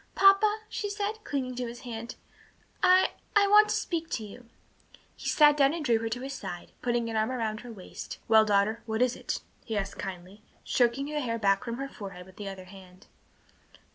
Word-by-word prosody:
"Papa," 415 +2 +5
she 410 - -3
said, 415 +1 -3
clinging 265 -7 -2
to 250 -1 -2
his 235 +1 -8
hand, 235 -1 -6 0.7
"I 370 -1 +5 0.2
I 410 -1 +6
want 420 +1 +6
to - - +1
speak 330 -2 -2
to 220 - -3
you." 230 +4 -12 0.7
He - - -4
sat 295 -1 +6
down 280 +1 +4
and 320 -3 -4
drew 230 -3 +3
her 225 0 -3
to 245 +2 -3
his 270 +1 -5
side, 185 -8 -7
putting 240 -1 0
an 225 - -4
arm 220 +1 +1
about 225 -4 -2
her 245 +1 -9
waist. 195 -5 -8
"Well, 220 -1 +7
daughter, 210 +1 +2
what 220 +2 +1
is 250 -1 +1
it?" - - -4 0.2
he 220 -3 -3
asked 200 0 -3
kindly, 185 +2 -7 0.2
stroking 245 +2 +2
the 300 +1 -2
hair 235 -5 -1
back 195 -1 +2
from 235 -1 -4
her 275 +1 -3
forehead 195 -8 -9
with 185 0 -17
the 205 -1 -5
other 190 -1 -9
hand. 185 -1 -15
235 Hz, 205 wpm, -29 LUFS, 205-290 Hz, 0.7 s, Well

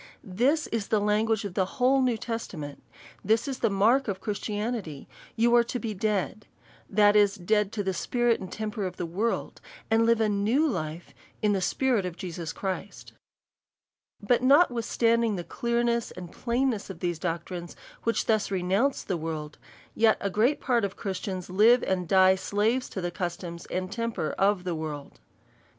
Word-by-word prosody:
This 255 - +1
is 225 -3 -2
the 215 - +2
lan 210 +1 +2
guage 225 -1 0
of 200 - -5
the 190 0 +1 0.3
New 250 -3 +1
Testament. 185 -11 -6 0.4
This 220 +6 +2
is 270 -2 -4
the 230 - +2
mark 225 +7 +3
of 195 -2 -2
Christianity; 210 - -4 0.3
you 235 +1 +3
are 240 - +6
to 250 - -3
be 225 -3 -4
dead; 210 +1 -2 0.4
that 205 0 +4
is, 205 -1 +4
dead 210 +2 +1
to 205 - -2
the 190 -1 -1
spirit 240 +5 +1
and 185 - -8
temper 215 -2 -3
of 180 - -8
the 175 - -3
world, 200 +8 -2 0.3
and 225 +1 +4
live 230 -1 +4
a 220 - +3
new 215 +9 +2
life 160 - -4 0.3
in 210 -1 +3
the 195 - 0
Spirit 250 +1 +1
of 175 -1 -7
Jesus 170 -3 -5
Christ, 190 +2 -5 1.1
But 230 +4 +2
notwithstanding 235 - +3
the 175 - -4
clearness 235 +2 0
and 180 -2 -9
plainness 240 -3 -1
of 185 -4 -8
these 175 -2 -2
doctrines 175 +1 -4 0.3
which 230 - 0
thus 220 -2 +1
renounce 195 +8 0
the 185 - -2
world, 155 -2 -5 0.3
yet 215 -3 +2
great 240 +8 +2
part 240 -4 +1
of 200 -1 -2
Christians 185 -2 -4
live 220 +7 +5
and 180 -2 -1
die 190 0 +6
slaves 210 +6 0
to 190 - -5
the 175 0 -2
cus 175 -1 -3
toms 170 -2 -8
and 185 +1 -3
tempers 230 -7 -2
of 195 -1 +2
the 180 -1 -2
world. 155 -3 -6
205 Hz, 170 wpm, -27 LUFS, 185-230 Hz, 1.1 s, are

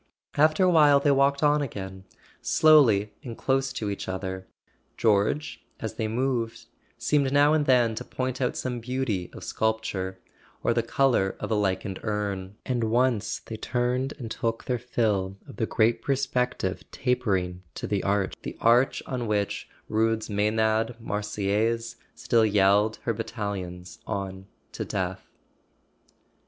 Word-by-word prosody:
After 155 +5 +4
a 185 - +5
while 150 -4 +6
they 145 0 +3
walked 140 +1 +3
on 150 0 +4
again, 95 -7 -6 0.4
slowly 120 -10 +5
and 120 -5 -7
close 135 0 +1
to 105 - -3
each 100 - -5
other. 95 0 -4 0.5
George, 110 +8 +1 0.2
as 110 - -4
they 110 0 -2
moved, 120 0 -1 0.3
seemed 140 -3 +1
now 145 +2 +5
and 150 -2 +2
then 120 -3 +4
to - - -5
point 130 0 -3
out 125 - 0
some 125 -1 -3
beauty 115 -7 -2
of - - -10
sculpture, 105 -4 -2 0.5
or - - +3
the 115 - +2
colour 115 -4 +2
of - - -4
a - - +3
lichened 95 -1 -1
urn; 100 -3 -3
and 120 -3 0
once 120 -1 +1
they 110 - -6
turned 125 +4 -1
and 115 -3 -7
took 115 0 -2
their 125 -1 -1
fill 105 -6 0
of - - -11
the 110 - 0
great 115 +1 +2
perspective 125 -8 -1
tapering 95 -8 -1
to - - -4
the 100 -2 0
Arch—the 100 -1 -2
Arch 120 +3 +3
on 125 -3 -3
which 105 -1 -1 0.2
Rude's 110 0 0
Msenad 110 +2 +1
Marseillaise 105 +2 -1 0.2
still 115 -1 +2
yelled 105 +1 +3
her 115 - 0
bat¬ 115 +1 -4
talions 95 -5 -5
on 95 -2 -4 0.2
to - - -4
death. - - -3
110 Hz, 145 wpm, -26 LUFS, 100-125 Hz, 0.5 s, while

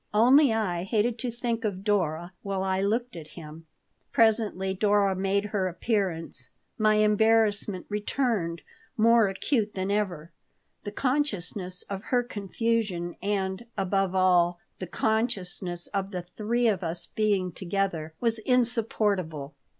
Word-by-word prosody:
Only 255 +5 +6
I 200 -6 -1
hated 220 +4 0
to 250 - -2
think 235 -1 -3
of 195 -3 -3
Dora 175 -4 0
while 195 -1 -2
I 190 0 0
looked 230 +4 -1
at 155 -1 -11
him 160 0 -10 0.4
Presently 215 -4 +2
Dora 200 0 +2
made 195 +2 0
her 200 -2 -1
appearance. 175 - 0 0.3
My 215 -1 +3
embarrassment 210 -2 +2
returned, 210 -5 -1 0.3
more 230 0 +5
acute 210 +3 -1
than 190 +1 -2
ever. 180 -6 -2 0.5
The 205 - -4
consciousness 205 - -2
of 195 0 -7
her 245 -1 +1
confusion 205 -5 -2
and, 195 +2 -2
above 195 0 0
all, 180 -2 +3 0.2
the 185 - -5
consciousness 195 -5 -1
of 195 -1 -3
the 180 -3 -5
three 225 +7 -1
of 205 -4 +1
us 170 +1 -2
being 200 -4 0
together, 170 -4 -3
was 230 -2 +1
insupportable. 215 - 0
200 Hz, 130 wpm, -27 LUFS, 180-220 Hz, 0.5 s, Only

